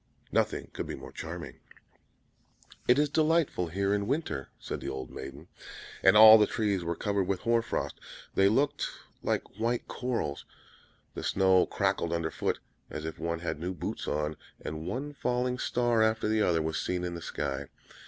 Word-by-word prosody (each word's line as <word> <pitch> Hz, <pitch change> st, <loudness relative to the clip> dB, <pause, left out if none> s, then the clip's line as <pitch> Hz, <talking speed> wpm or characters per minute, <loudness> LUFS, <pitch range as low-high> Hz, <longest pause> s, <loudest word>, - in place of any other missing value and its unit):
Nothing -, -, 0 dB
could -, -, -4 dB
be -, -, -4 dB
more -, -, -10 dB
charming. -, -, -7 dB, 1.3 s
"It 125 Hz, -, +6 dB
is 150 Hz, +1 st, +4 dB
delightful 155 Hz, -, +2 dB
here 100 Hz, +4 st, 0 dB
in 100 Hz, 0 st, 0 dB
winter!" 115 Hz, -, -2 dB
said -, -, -5 dB
the -, -, -6 dB
little 65 Hz, -1 st, -4 dB
maiden. 70 Hz, +5 st, -9 dB, 0.5 s
And -, -, +6 dB
all 110 Hz, 0 st, +11 dB
the 105 Hz, -, +5 dB
trees 100 Hz, -5 st, 0 dB
were 85 Hz, 0 st, -2 dB
covered 100 Hz, 0 st, 0 dB
with 95 Hz, -1 st, -1 dB
hoar 115 Hz, 0 st, +3 dB
frost; 115 Hz, -, -3 dB, 0.3 s
they 95 Hz, 0 st, +5 dB
looked 140 Hz, +6 st, +1 dB, 0.3 s
like 105 Hz, -, -2 dB
white 120 Hz, +1 st, 0 dB
corals; 115 Hz, -, -2 dB, 0.7 s
the -, -, -5 dB
snow 95 Hz, -1 st, +4 dB
crackled 100 Hz, -4 st, 0 dB
under 85 Hz, -1 st, -1 dB
foot, -, -, -1 dB, 0.3 s
as 75 Hz, 0 st, -5 dB
if 80 Hz, -, -5 dB
one 85 Hz, 0 st, -2 dB
had 85 Hz, -, -3 dB
new 90 Hz, +3 st, -3 dB
boots -, -, -4 dB
on; 75 Hz, +1 st, -1 dB, 0.2 s
and 80 Hz, +1 st, -5 dB
one 145 Hz, +4 st, -3 dB
falling 125 Hz, -1 st, -1 dB
star 120 Hz, -2 st, +2 dB
after 110 Hz, 0 st, +2 dB
the 110 Hz, 0 st, +2 dB
other 80 Hz, -5 st, +2 dB
was 80 Hz, 0 st, -1 dB
seen 90 Hz, -1 st, -2 dB
in 90 Hz, -1 st, -2 dB
the 85 Hz, -, -6 dB
sky. -, -, -3 dB
100 Hz, 175 wpm, -30 LUFS, 85-120 Hz, 1.3 s, all